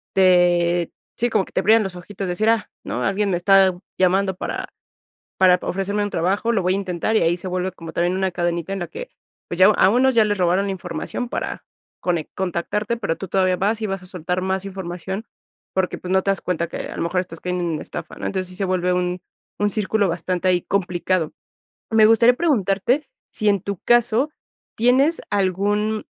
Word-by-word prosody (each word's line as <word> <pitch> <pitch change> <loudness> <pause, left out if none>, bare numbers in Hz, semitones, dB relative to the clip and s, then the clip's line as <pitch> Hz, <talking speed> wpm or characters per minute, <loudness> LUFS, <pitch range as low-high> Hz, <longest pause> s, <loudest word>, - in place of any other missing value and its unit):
te 175 -2 +3 0.3
sí, 240 - +1
como 210 -4 +1
que - - -17
te - - +1
brillan 220 +3 +5
los 190 -2 -5
ojitos 195 +1 -6
decir: 210 +5 +1
"Ah, 225 -2 +1
¿no? - - -3
Alguien 200 +1 0
me 175 - +1
está 190 0 +5 0.3
llamando 190 +1 +2
para - - -4 0.7
para 180 -1 +6
ofrecerme 200 +2 -1
un 205 - -3
trabajo, 195 +7 0
lo 200 -5 +1
voy 180 - +2
a - - +1
intentar". 190 +2 -2
Y - - +3
ahí 170 +1 +2
se 185 - -8
vuelve 185 +1 -1
como 165 -2 -9
también 175 +2 0
una 190 0 0
cadenita 175 0 -2
en 195 - -4
la 175 - -4
que, - - -8 0.4
pues 175 - -5
ya 185 - +9
a 200 -2 +5
unos 255 +2 +3
ya 220 - +6
les 205 -1 0
robaron 180 +2 +2
la 195 - -1
información 215 +6 -5
para - - -4 0.4
conec 170 -4 -1
contactarte, 190 +5 -2
pero 180 -7 -2
tú 195 - -7
todavía 185 0 +2
vas 210 +4 0
y 215 - 0
vas 195 -1 -4
a - - -12
soltar 180 +1 -3
más 190 0 -1
información, 190 +2 -5 0.5
porque, 190 -1 0
pues, 185 +1 -5
no 190 - +3
te 195 - +1
das 195 - 0
cuenta 170 -2 -1
que - - -7
a - - -6
lo - - -2
mejor 180 +2 0
estás 165 -3 -8
cayendo 180 -1 -2
en 160 -3 -2
estafa, - - -7
¿no? - - -5
Entonces 185 -2 -2
sí 180 - -8
se 195 - -1
vuelve 180 -1 +1
un 180 0 -1 0.4
un 205 0 +2
círculo 210 -1 +1
bastante 180 +2 -2
ahí 180 -1 +2
complicado. 180 -3 -1 0.6
Me 220 -1 +6
gustaría 230 +2 +6
preguntarte 250 - +1 0.2
si 215 -1 +1
en 200 -3 +2
tu 200 -2 -4
caso, 240 +3 +3 0.5
¿tienes 260 +8 +3
algún 205 +2 0
190 Hz, 210 wpm, -22 LUFS, 180-210 Hz, 0.7 s, ya